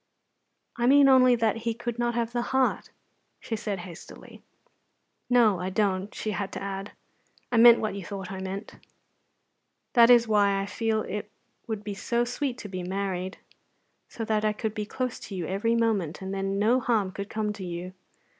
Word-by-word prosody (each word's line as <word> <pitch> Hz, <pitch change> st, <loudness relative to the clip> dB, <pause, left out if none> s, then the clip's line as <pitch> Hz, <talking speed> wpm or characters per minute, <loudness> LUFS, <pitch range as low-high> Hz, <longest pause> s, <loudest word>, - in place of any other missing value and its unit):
"I 240 Hz, 0 st, +1 dB
mean 280 Hz, +1 st, +7 dB
only 255 Hz, -2 st, +6 dB
that 225 Hz, -2 st, +1 dB
He 230 Hz, 0 st, -2 dB
could 240 Hz, 0 st, -5 dB
not 240 Hz, 0 st, 0 dB
have 235 Hz, 0 st, -1 dB
the 240 Hz, -, 0 dB
heart," 265 Hz, +1 st, 0 dB, 0.5 s
she 225 Hz, -, -4 dB
said 210 Hz, -2 st, -3 dB
hastily. 175 Hz, -2 st, -12 dB, 0.9 s
"No, 230 Hz, -7 st, +4 dB
I 180 Hz, +1 st, -2 dB
don't," 195 Hz, 0 st, 0 dB
she 215 Hz, -, -3 dB
had 200 Hz, -2 st, -3 dB
to -, -, -4 dB
add. 195 Hz, +1 st, -5 dB, 0.6 s
"I 240 Hz, -, +2 dB
meant 235 Hz, 0 st, +8 dB
what 215 Hz, -, -2 dB
you 200 Hz, -1 st, -6 dB
thought 195 Hz, 0 st, -6 dB
I 190 Hz, -, -5 dB
meant. 190 Hz, +2 st, -6 dB, 1.2 s
That 235 Hz, -1 st, +7 dB
is 240 Hz, -1 st, +6 dB
why 200 Hz, -2 st, +3 dB
I 195 Hz, -, -2 dB
feel 220 Hz, +1 st, -1 dB
it 210 Hz, 0 st, -5 dB, 0.4 s
would 215 Hz, -2 st, -4 dB
be 205 Hz, 0 st, -4 dB
so 235 Hz, +4 st, 0 dB
sweet 250 Hz, +1 st, -3 dB
to 210 Hz, -, -8 dB
be 185 Hz, -2 st, -5 dB
married, 190 Hz, 0 st, -3 dB, 0.7 s
so 225 Hz, -, -5 dB
that 215 Hz, -1 st, 0 dB
I 215 Hz, 0 st, +2 dB
could 215 Hz, 0 st, -3 dB
be 210 Hz, -1 st, -4 dB
close 255 Hz, +2 st, -3 dB
to 200 Hz, -, -8 dB
you 175 Hz, -3 st, -3 dB
every 205 Hz, +7 st, 0 dB
moment, 210 Hz, -8 st, 0 dB
and 190 Hz, 0 st, -5 dB
then 195 Hz, 0 st, -2 dB
no 225 Hz, +5 st, +3 dB
harm 220 Hz, -6 st, 0 dB
could 200 Hz, +2 st, -6 dB
come 215 Hz, -1 st, -2 dB
to 200 Hz, -, -8 dB
you. 175 Hz, +1 st, -6 dB
210 Hz, 190 wpm, -27 LUFS, 195-235 Hz, 1.2 s, meant